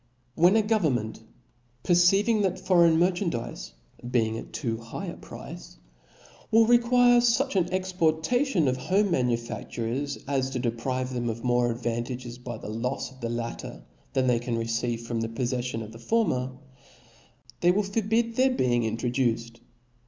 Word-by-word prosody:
when 175 +7 +4
a 220 - +4
go 220 +1 +2
vernment 120 - -1 0.6
perceiving 195 +5 +4
that 190 -2 0
foreign 170 -3 +4
merchandizes^ 175 - -1 0.4
being 110 -3 +1
at - - -7
too 115 -5 -2
high 115 0 -7
a - - -6
price, - - -10 0.7
will 225 +1 +5
require 245 +1 +5
fuch 245 +2 +2
an 180 -2 +1
exportation 185 - +1
of 130 0 +1
home 195 +9 +1
manufa&ures, 120 +1 -2
as 135 -2 0
to 135 - -4
de* 120 -2 0
prive 130 +2 -3
them 120 -1 -1
of 115 +1 -5
more 120 -1 +2
advantages 120 +1 -4
by 120 -2 -6
the - - -9
lofs 120 +5 -3
of 130 - -17
the 115 - -2
latter, 115 - -5 0.3
than 130 -1 +2
they 125 -2 +3
can 120 -1 -2
receive 115 +1 -1
from 115 -1 -3
the 115 - -2
pofleflioQ 120 0 -2
of 110 - -10
the. 115 - -12
former, 130 - 0 1.1
they 175 - +3
will 200 +4 +3
forbid 225 +3 0
their 260 +2 +4
being 125 - +1
in* 110 0 -1
troduced. 120 -1 -1
130 Hz, 160 wpm, -27 LUFS, 120-190 Hz, 1.1 s, will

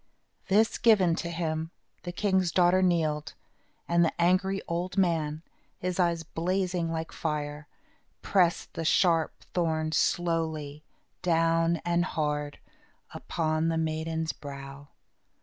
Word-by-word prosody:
This 215 +3 +3
given 200 -7 +5
to 170 - -3
him, 160 -1 -2 0.3
the 175 - -5
king's 190 -1 +1
daughter 180 +2 +4
kneeled, 160 -5 0 0.5
and 170 0 +3
the 165 - -1
angry 185 +3 +2
old 175 +3 -3
man, 160 -4 +1 0.3
his 180 0 -3
eyes 170 -2 +1
blazing 180 +1 -1
like 160 0 -4
fire, 150 -1 -4 0.6
pressed 180 -3 +1
the 165 - -4
sharp 165 0 +3 0.2
thorns 160 -2 0
slowly, 160 -4 -1 0.4
down 165 -1 +2
and 175 0 +2
hard, 150 -4 -2 0.6
upon 155 -1 -1
the 165 0 0
maiden's 160 0 -2
brow. 140 0 -9
165 Hz, 115 wpm, -28 LUFS, 155-175 Hz, 0.6 s, given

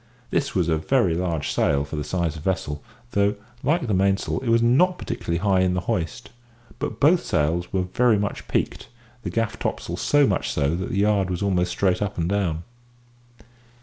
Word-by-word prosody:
This 140 -3 0
was 90 -3 +2
a 80 -2 +1
very 95 - +2
large 85 -3 -1
sail 70 0 +1
for 70 - -6
the 75 - -2
size 85 0 -1
of 75 - -9
the 95 - +1
vessel, 75 -6 -2 0.3
though, 100 +1 +2 0.3
like 150 +2 +1
the 110 - -1
mainsail, 95 +3 +1
it 125 -2 -3
was 115 0 +4
not 175 +10 +4
particularly 85 - -3
high 95 +1 +2
in 90 0 +2
the 90 - 0
hoist; 90 +7 -3 0.5
but 115 - -4
both 170 +5 +4
sails 80 +2 0
were 95 -2 +1
very 115 +5 +2
much 100 0 -3
peaked, - - -2 0.3
the - - -4
gaff 115 -2 -2
topsail - - -3
so 145 -1 +3
much 100 -7 0
so 75 +2 0
that 95 +2 -3
the - - -2
yard 100 -2 +2
was 90 +1 -2
almost 90 -3 +1
straight 90 0 +1
up 105 0 -2
and 85 0 0
down. 90 -5 0
95 Hz, 200 wpm, -24 LUFS, 85-110 Hz, 0.5 s, was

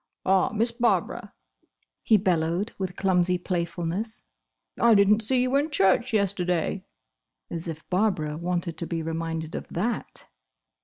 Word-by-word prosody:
"Ah, 190 0 +3
Miss 225 +2 +1
Barbara," 235 0 0 0.7
he 220 - +4
bellowed, 180 +1 0
with 185 -2 -3
clumsy 180 -2 +2
playfulness, 175 +4 -3 0.5
"I 235 -1 +6
didn't 205 +2 +5
see 250 +3 +1
you 255 +1 0
in 290 +3 0
church 235 - +3
yesterday!" 185 -3 0 0.7
As 170 0 -4
if 155 -1 -7
Barbara 180 -6 0
wanted 170 0 -3
to 170 - -1
be 165 -2 -3
reminded 165 0 -4
of - - -5
that! 225 +8 -3
185 Hz, 135 wpm, -26 LUFS, 170-215 Hz, 0.7 s, I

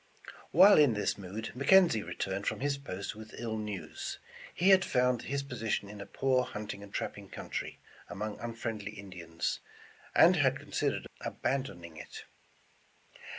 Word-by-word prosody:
While 190 +5 +8
in 140 -7 +5
this 105 -1 0
mood, 100 +3 -6
McKenzie 140 - +5
returned 95 +1 -3
from - - -1
his 145 0 +1
post 100 -9 -6
with 110 0 -10
ill 115 -2 -3
news. 105 -3 -5 0.3
He 185 +3 +2
had 190 -1 +7
found 125 -5 +2
his 140 +1 -2
position 115 -6 -2
in 105 -1 -8
a 100 - -8
poor 130 +3 +2
hunting 105 -4 -6
and 100 -1 -11
trapping - - -4
country, - - -5 0.3
among 105 +1 -4
unfriendly 115 -3 -4
Indi 100 -4 -9
ans, 85 +1 -2 0.6
and - - +7
had - - +3
considered - - -1 0.2
abandoning 85 - -3
it. - - -9
110 Hz, 150 wpm, -31 LUFS, 100-135 Hz, 0.6 s, While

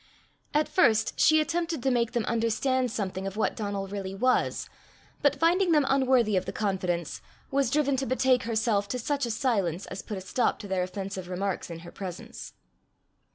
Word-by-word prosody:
At 300 +1 +2
first 220 - +2
she 315 0 +6
attempted 330 -2 -1
to 265 - +2
make 235 -1 +1
them 235 -3 0
understand 245 +3 +1
something 195 -3 -3
of 195 +1 -6
what 220 - 0
Donal 200 -2 -3
really 195 -1 -5
was, 255 +6 +1 0.5
but 285 -1 +3
finding 340 +4 +3
them 300 -3 +4
unworthy 260 -5 +3
of 185 - +1
the - - -2
confidence, 180 -5 -2 0.3
was 275 -2 +2
driven 280 0 +2
to 270 - -2
betake 255 0 +3
herself 220 -3 +1
to 250 - -2
such 275 +2 -1
a - - -4
silence 205 - 0
as 195 - -6
put 210 - -6
a - - -5
stop 190 +7 0
to 205 - -8
their 190 -1 0
offensive 190 0 -5
remarks 185 0 -2
in 165 -1 -7
her 170 - -11
presence. 185 -2 -8
225 Hz, 185 wpm, -28 LUFS, 195-265 Hz, 0.5 s, she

